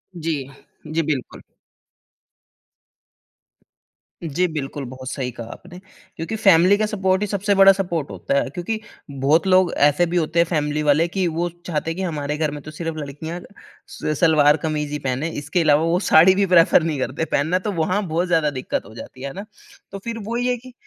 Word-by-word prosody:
जी। 160 -4 -2 0.4
जी, 160 +2 0
बिल्कुल। 145 -5 -4 2.8
जी, 165 +3 0
बिल्कुल 145 -3 -5
बहुत 130 0 -8
सही 125 -2 -3
कहा 115 -1 -9
आपने 180 +1 -13 0.4
क्योंकि 165 +7 -4
फैमिली 195 -1 +5
का 215 - +1
सपोर्ट 190 -2 0
ही 210 - 0
सबसे 200 0 0
बड़ा 195 0 +8
सपोर्ट 175 -6 -2
होता 140 - -1
है। - - -2
क्योंकि 180 +8 -4 0.3
बहुत 145 +7 +2
लोग 185 -1 +4
ऐसे 145 +4 +4
भी 175 +1 -2
होते 165 +1 0
हैं 170 - +5
फैमिली 150 -2 -1
वाले 150 +3 +3
कि 185 0 -1
वो 170 +2 -1 0.2
चाहते 165 -1 -2
हैं - - -5
कि, 190 - -2
हमारे 150 -4 -3
घर 155 -2 0
में 145 -1 -7
तो 155 - -10
सिर्फ़ 165 0 -5
लड़कियाँ 155 +4 -6 0.5
स 155 -1 -4
सलवार-कमीज 150 -1 +2
ही 150 - -2
पहने 135 +4 -2
इसके 155 +5 -1
अलावा 150 0 +4
वो 170 +2 +2
साड़ी 170 +4 +7
भी 200 0 +2
प्रेफर 170 -2 +5
नहीं 155 -4 -2
करते 130 +6 -2
पहनना 165 +6 0
तो 205 +2 -3
वहाँ 180 +4 0
बहुत 170 +3 -1
ज़्यादा 160 -3 +2
दिक्कत 130 -2 -4
हो 110 - -13
जाती 130 - -11
है। 140 - -4
है 135 - -7
ना? 200 +2 -7 0.5
तो 195 - -6
फिर 230 +3 -5
वो 230 +3 -4
ही 245 +1 0
है 250 - +1
कि 255 +1 -14
165 Hz, 195 wpm, -21 LUFS, 145-185 Hz, 2.8 s, बड़ा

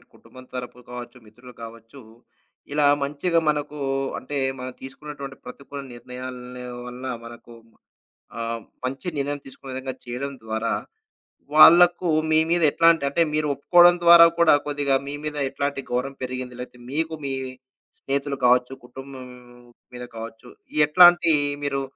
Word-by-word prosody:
ఇ - - -26
కుటుంబం 130 0 -15
తరపు 125 -1 -6
కావచ్చు, 125 0 -8
మిత్రులు 120 +4 -16
కావచ్చు. 115 +3 -11 0.7
ఇలా 145 0 +2 0.2
మంచిగా 150 +5 0
మనకు 150 0 -2 0.4
అంటే 145 +2 -7 0.2
మనం 130 0 -6
తీసుకున్నటువంటి 140 0 -9
ప్రతికూల 140 +3 -9
నిర్ణయాల 125 0 -9 0.3
వల్ల 125 +1 -9 0.2
మనకు 120 0 -12 0.9
ఆహ, 115 0 -3 0.3
మంచి 135 +7 -4
నిర్ణయం 145 +1 -2
తీసుకునే 135 0 -11
విధంగా 130 0 -5
చేయడం 125 +3 -5
ద్వారా, 110 +1 -2 0.8
వాళ్ళకు 175 +3 +7 0.2
మీ 155 - +5
మీద 175 0 +2
ఎట్లాంటి 165 -1 +4
అంటే 140 - 0
మీరు 155 0 0
ఒప్పుకోడం 175 +5 +5
ద్వారా 170 0 +9
కూడా 170 -2 +6
కొద్దిగా 145 -2 0
మీ 140 - -5
మీద 150 -1 -4
ఎట్లాంటి 140 0 -3
గౌరవం 125 +3 -2
పెరిగింది? 125 -1 -5
లేతే 125 0 -9
మీకు 160 +2 -1
మీ 135 - -2 0.7
స్నేహితులు 140 0 -2
కావచ్చు, 125 +1 +3
కుటుంబం 130 +1 -10 0.7
మీద 125 0 -7
కావచ్చు, 115 0 -9 0.4
ఎట్లాంటి 175 +1 +6 0.3
మీరు 140 -1 -1
135 Hz, 130 wpm, -23 LUFS, 125-150 Hz, 0.9 s, ద్వారా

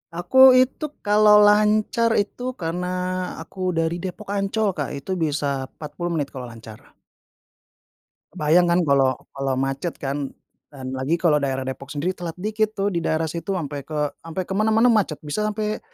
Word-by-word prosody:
Aku 260 +9 +6
itu 260 +4 +2 0.2
kalau 210 0 +5
lancar 215 +2 +3
itu 245 +5 -2
karena 175 0 -3 0.6
aku 185 0 -4
dari 165 +1 0
Depok- 195 +3 -6
Ancol, 200 +1 0
Kak, 145 -4 -4
itu 180 +7 -4
bisa 145 -4 -1
40 170 +3 -5
menit 145 -3 -2
kalau 130 -3 -7
lancar. 115 -2 -13 1.4
Kebayang, 165 +4 +3
kan, 170 +1 +3
kalau 135 -3 +3 0.2
kalau 135 -1 -2
macet, 135 +5 -2
kan, 140 0 -3 0.4
dan 130 -3 -8
lagi 130 +5 0
kalau 160 -4 +2
daerah 135 -1 -2
Depok 130 0 -6
sendiri 150 +6 -2
telat 175 -3 -6
dikit, 215 +3 -1
tuh, 200 +1 0
di 170 - -1
daerah 160 0 0
situ 170 +4 -3
ampe 145 -5 -5
ke 150 -2 -1
ampe 165 +3 -5
ke 190 - -12
mana-mana 220 +4 +3
macet, 205 -9 +1
bisa 180 +9 -2
sampai, 215 0 -2
170 Hz, 160 wpm, -23 LUFS, 145-210 Hz, 1.4 s, Aku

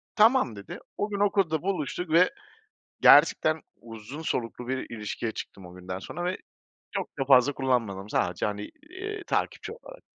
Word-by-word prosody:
"Tamam." 220 - +4
dedi. 100 -1 -8 0.2
O 205 - -1
gün 200 -1 -3
okulda 195 -6 +2
buluştuk 180 -2 -2
ve 175 +3 +6 0.7
gerçekten 155 0 +6 0.2
uzun 115 +6 -9
soluklu 125 -4 -3
bir 130 0 -2
ilişkiye 110 +1 -4
çıktım 95 -3 -8
o 90 - -12
günden 90 0 -6
sonra 175 - -6
ve 180 +1 -1 0.6
çok - - -2
da 135 - 0
fazla 135 +1 +6
kullanmadım 115 -8 -1
sadece, - - 0
hani, 105 0 -3 0.2
iii, 410 +3 -6
takipçi - - -1
olarak. - - -13
135 Hz, 155 wpm, -27 LUFS, -, 0.7 s, ve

